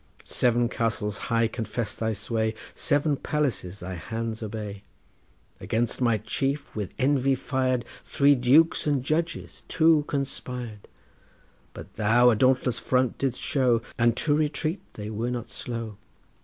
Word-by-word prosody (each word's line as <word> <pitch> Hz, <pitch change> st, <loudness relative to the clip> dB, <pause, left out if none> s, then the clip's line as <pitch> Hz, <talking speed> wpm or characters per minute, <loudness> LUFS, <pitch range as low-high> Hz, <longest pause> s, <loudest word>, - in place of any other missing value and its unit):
Seven 120 Hz, -1 st, +2 dB
castles 110 Hz, -3 st, -2 dB
high 115 Hz, -1 st, +3 dB
confess 110 Hz, 0 st, -4 dB
thy 110 Hz, 0 st, -1 dB
sway, 110 Hz, +1 st, -1 dB, 0.2 s
Seven 145 Hz, 0 st, +1 dB
palaces 130 Hz, -, -2 dB
thy 95 Hz, +1 st, -5 dB
hands 110 Hz, +6 st, -4 dB
obey. 105 Hz, -2 st, -5 dB, 0.8 s
Against 115 Hz, +3 st, -1 dB
my 115 Hz, -3 st, +3 dB
chief, 135 Hz, +7 st, -3 dB
with 105 Hz, -4 st, -4 dB
envy 135 Hz, 0 st, +2 dB
fired, 130 Hz, -2 st, -1 dB, 0.2 s
Three 140 Hz, +1 st, +4 dB
dukes 145 Hz, +7 st, +4 dB
and 140 Hz, -4 st, +1 dB
judges 160 Hz, +4 st, -2 dB
two 160 Hz, -2 st, +4 dB
conspired, 125 Hz, -6 st, -4 dB, 0.9 s
But -, -, -11 dB
thou 120 Hz, +3 st, +5 dB
a -, -, +2 dB
dauntless 125 Hz, 0 st, +2 dB
front 125 Hz, -1 st, +1 dB
didst 130 Hz, -3 st, -1 dB
show, 125 Hz, -5 st, +2 dB
And 120 Hz, 0 st, +2 dB
to 150 Hz, -, +2 dB
retreat 155 Hz, +4 st, -1 dB
they 105 Hz, 0 st, -6 dB
were 115 Hz, +3 st, -2 dB
not 120 Hz, -1 st, -4 dB
slow. 115 Hz, -5 st, -5 dB
120 Hz, 135 wpm, -26 LUFS, 110-135 Hz, 0.9 s, thou